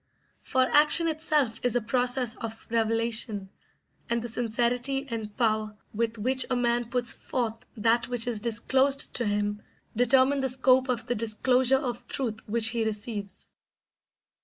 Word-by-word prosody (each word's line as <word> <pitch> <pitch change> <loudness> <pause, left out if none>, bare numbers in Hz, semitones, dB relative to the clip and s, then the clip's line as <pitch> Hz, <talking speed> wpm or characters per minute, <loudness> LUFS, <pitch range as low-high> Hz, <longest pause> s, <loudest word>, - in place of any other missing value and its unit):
For 260 - +1
action 300 +5 +4
itself 300 -7 0
is 245 -1 +2
a - - +3
process 245 +1 0
of 225 0 -8
revelation, 225 -3 0 0.6
and 235 - 0
the 235 - -5
sincerity 245 +4 -1
and 220 -4 -6
power 215 -2 0 0.2
with 230 +1 -2
which 255 +4 -1
a 255 - 0
man 240 -1 0
puts 245 -1 +3
forth 230 -3 -4
that 235 +3 +1
which 245 -2 -1
is 240 -3 -2
disclosed 260 +5 +1
to 240 - 0
him 205 0 -2 0.3
determine 260 +4 +4
the 265 -1 0
scope 260 0 +3
of 240 -2 -2
the 245 - -1
disclosure 250 +4 +2
of 245 -2 -5
truth 235 -5 -3
which 225 +1 +4
he 230 -1 -1
receives. 210 -2 -4
235 Hz, 150 wpm, -27 LUFS, 225-255 Hz, 0.6 s, action